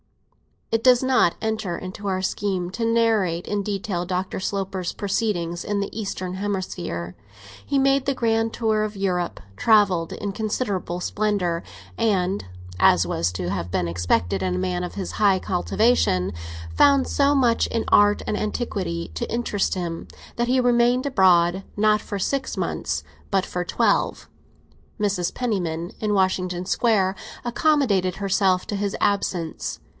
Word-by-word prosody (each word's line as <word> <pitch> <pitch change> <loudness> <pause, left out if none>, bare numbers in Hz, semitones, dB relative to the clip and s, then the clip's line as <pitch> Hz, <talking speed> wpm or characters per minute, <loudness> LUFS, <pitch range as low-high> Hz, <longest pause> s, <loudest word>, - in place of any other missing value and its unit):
It 225 0 +1
does 250 -1 +5
not 255 -9 +3
enter 220 -5 -2
into 190 +2 -7
our 185 -1 0
scheme 190 -2 -2
to 230 +4 -2
narrate 220 -7 +2
in 205 -1 -1
detail 195 -3 -3
Dr. 185 +1 -2
Sloper's 190 -2 -3
proceedings 195 -5 -1
in 205 -1 -1
the 200 - -3
eastern 185 -4 -4
hemisphere. 185 - -3 0.5
He 280 - -1
made 275 0 +3
the 275 - 0
grand 225 -1 +1
tour 220 -2 +1
of 215 0 -4
Europe, 180 -3 -1 0.2
travelled 190 - +3
in 205 - -4
considerable 200 -4 -2
splendour, 190 -5 0 0.4
and 195 -4 +1 0.3
(as 90 0 +5
was 85 0 -1
to 90 -1 -3
have 90 -2 -3
been 90 0 -1
expected 85 +2 0
in 90 -1 0
a - - -1
man 180 - -1
of 180 - -6
his 195 -2 -4
high 200 -3 +3
cultivation) 180 - +1 0.4
found 280 -2 +5
so 285 0 +2
much 245 -4 +3
in 230 - -1
art 205 0 +5
and 210 - -1
antiquity 195 -6 -3
to 235 - -4
interest 225 -5 0
him, 170 -2 -4 0.3
that 240 0 +1
he 255 +1 +3
remained 245 +1 +3
abroad, 185 -7 +4
not 215 0 +3
for 205 - -5
six 265 +7 -1
months, - - -2 0.3
but 195 -2 +1
for 180 - -3
twelve. - - 0 0.7
Mrs. 195 -4 0
Penniman, 175 -8 -2
in 210 -1 0
Washington 185 -2 0
Square, 195 -2 +2 0.3
accommodated 240 -8 +2
herself 195 -2 +1
to 205 - -3
his 200 0 -2
absence. 180 -5 -1
195 Hz, 150 wpm, -23 LUFS, 180-225 Hz, 0.7 s, does